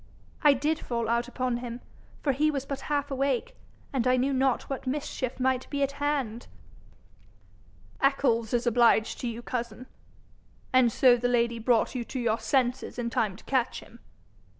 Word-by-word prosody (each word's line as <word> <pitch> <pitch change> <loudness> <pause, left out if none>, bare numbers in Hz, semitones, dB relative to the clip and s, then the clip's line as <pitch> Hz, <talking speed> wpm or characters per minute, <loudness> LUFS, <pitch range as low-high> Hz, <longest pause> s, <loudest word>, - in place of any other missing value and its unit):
'I 295 -2 +6
did 300 +4 0
fall 235 -2 -3
out 235 +1 +1
upon 250 -1 -2
him, 240 0 -6 0.4
for 285 - +3
he 300 +4 +2
was 275 -3 -2
but 275 -1 -4
half 285 -1 -1
awake, 275 - -1 0.4
and 255 -2 +1
I 255 0 +4
knew 270 +2 +1
not 265 -1 +1
what 270 -1 -5
mischief 260 -2 -3
might 260 0 0
be 285 -1 -1
at 275 - 0
hand.' 280 -5 -2 1.5
'Eccles 250 -5 +2
is 240 0 0
obliged 235 -2 +3
to 245 - -3
you, 235 0 -5
cousin. 235 0 -4 0.9
And 255 -2 +5
so 245 +1 +5
the 245 +1 0
lady 235 -1 +1
brought 230 0 +2
you 250 -2 -2
to 260 - -5
your 230 -2 0
senses 250 +2 0
in 235 -1 -2
time 210 -5 0
to - - -15
catch 260 -2 0
him?' 235 - -16
250 Hz, 175 wpm, -28 LUFS, 235-275 Hz, 1.5 s, I